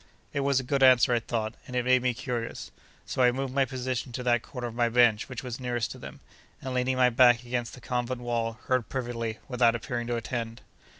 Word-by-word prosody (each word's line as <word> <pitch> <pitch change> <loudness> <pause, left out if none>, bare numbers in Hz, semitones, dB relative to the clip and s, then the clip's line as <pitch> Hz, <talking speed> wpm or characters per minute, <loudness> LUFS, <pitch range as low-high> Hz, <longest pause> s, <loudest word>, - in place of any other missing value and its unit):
It 145 - -1
was 140 -1 +2
a - - -3
good 135 +2 -1
answer, 130 -2 +6
I 120 - +3
thought, 110 -1 -3
and 125 - -7
it 125 -1 0
made 130 0 +4
me 125 -1 0
curious. 120 -2 -4 0.3
So, - - -2
I 125 -1 +6
moved 130 +1 -3
my 135 0 +3
position 130 -1 -3
to 125 - -4
that 120 -2 +2
corner 125 -1 -7
of 120 - -5
my 120 0 +1
bench 120 -2 +3
which 130 -1 -6
was 125 -1 -5
nearest 120 -2 -2
to - - -9
them, - - -10 0.4
and 130 -1 -5
leaning 130 +1 0
my 125 -1 +4
back 120 -1 +5
against 120 -1 -3
the 125 - -14
convent 125 0 -2
wall, 115 -1 -1
heard 130 -3 0
perfectly, 115 -3 -3
without 120 -3 +3
appearing 120 +1 -4
to 120 - -1
attend. 115 0 -4
125 Hz, 230 wpm, -28 LUFS, 120-130 Hz, 0.4 s, answer